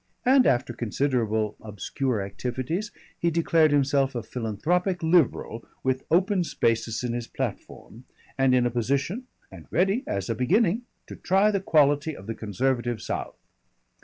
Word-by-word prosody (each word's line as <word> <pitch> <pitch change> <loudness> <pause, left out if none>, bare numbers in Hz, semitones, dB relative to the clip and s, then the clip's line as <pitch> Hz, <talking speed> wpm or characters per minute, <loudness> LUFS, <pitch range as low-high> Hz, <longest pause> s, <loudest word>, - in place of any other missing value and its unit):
And 260 +1 +5
after 120 -1 +1
considerable 115 -3 -1
obscure 110 +2 -3
activities 130 - -3 0.3
he 170 - +2
declared 165 -1 +3
himself 140 -2 +2
a 120 - -3
philanthropic 165 - -1
Liberal 160 -8 +2 0.2
with 130 0 -1
open 185 +3 +3
spaces 115 -6 -1
in 120 -1 -2
his 120 -1 -4
platform, 120 +4 -6 0.3
and 135 -1 +3
in 125 -1 +3
a 120 - +1
position, 140 - -1 0.2
and - - -12
ready 195 +7 +1
as 100 -1 -2
a 115 - 0
beginning, 205 - +1 0.2
to - - -9
try 195 +3 +2
the 200 - 0
quality 145 -3 +2
of 95 - -11
the 115 - -3
conservative 120 +3 -1
South. - - -5
135 Hz, 145 wpm, -26 LUFS, 115-170 Hz, 0.3 s, And